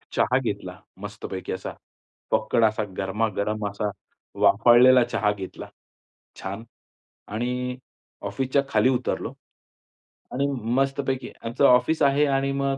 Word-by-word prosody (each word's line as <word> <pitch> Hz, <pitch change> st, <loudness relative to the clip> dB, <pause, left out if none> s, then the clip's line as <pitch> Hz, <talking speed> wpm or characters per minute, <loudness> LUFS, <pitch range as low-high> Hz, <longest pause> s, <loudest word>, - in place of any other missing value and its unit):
चहा -, -, +3 dB
घेतला -, -, -5 dB, 0.2 s
मस्तपैकी 100 Hz, -2 st, -6 dB
असा 95 Hz, -, -5 dB, 0.6 s
फक्कड 115 Hz, +1 st, +2 dB
असा 110 Hz, 0 st, +1 dB
गरमागरम 105 Hz, +1 st, -1 dB
असा 105 Hz, +1 st, -3 dB, 0.5 s
वाफाळलेला 120 Hz, +3 st, +6 dB
चहा 105 Hz, -, 0 dB
घेतला, 95 Hz, -2 st, -8 dB, 0.7 s
छान. 100 Hz, +4 st, -5 dB, 0.6 s
आणि 125 Hz, +3 st, -3 dB, 0.5 s
ऑफिसच्या 135 Hz, +1 st, 0 dB
खाली 130 Hz, -, +3 dB
उतरलो. 130 Hz, -2 st, -1 dB, 1.0 s
आणि 140 Hz, +2 st, 0 dB, 0.3 s
मस्तपैकी 135 Hz, -1 st, -1 dB, 0.2 s
आमचं 120 Hz, +5 st, +1 dB
ऑफिस 125 Hz, +6 st, +3 dB
आहे 140 Hz, +1 st, +4 dB
आणि 135 Hz, 0 st, 0 dB
मग 140 Hz, 0 st, -1 dB
120 Hz, 110 wpm, -24 LUFS, 105-135 Hz, 1.0 s, वाफाळलेला